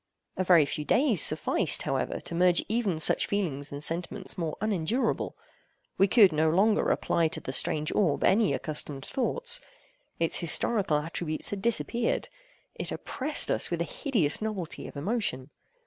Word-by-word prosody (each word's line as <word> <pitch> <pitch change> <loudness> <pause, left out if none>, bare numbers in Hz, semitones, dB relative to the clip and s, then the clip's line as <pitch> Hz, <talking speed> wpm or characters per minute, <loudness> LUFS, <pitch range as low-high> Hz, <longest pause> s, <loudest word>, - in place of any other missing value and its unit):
A 185 - -1
very 175 -4 +5
few 150 +1 -4
days 240 - +3
sufficed, - - +4
however, - - -2
to - - -7
merge 175 0 +3
even 215 -6 -1
such 155 - +3
feelings 155 -9 -3
in 145 0 -7
sentiments 175 +5 -2
more 165 -4 -4
unendurable 215 +3 -1 0.6
We 195 - +5
could 200 -2 +5
no 155 +1 +2
longer 200 +6 +2
apply 165 -1 +1
to 160 - -5
the 130 - -6
strange 155 +3 0
orb 175 -9 +1
any 205 +1 +3
accustomed 145 -3 -3
thoughts. 485 - 0 0.6
Its 165 -1 +3
historical 175 0 +1
attributes 155 +1 -4
had 200 -1 -4
disappeared. 235 +1 -1 0.4
It - - -5
oppressed 290 +3 -1
us - - +1
with 170 - -3
a - - +1
hideous 190 - -1
novelty 205 -7 -5
of - - -11
emotion. 155 - -2
180 Hz, 155 wpm, -27 LUFS, 155-215 Hz, 0.6 s, very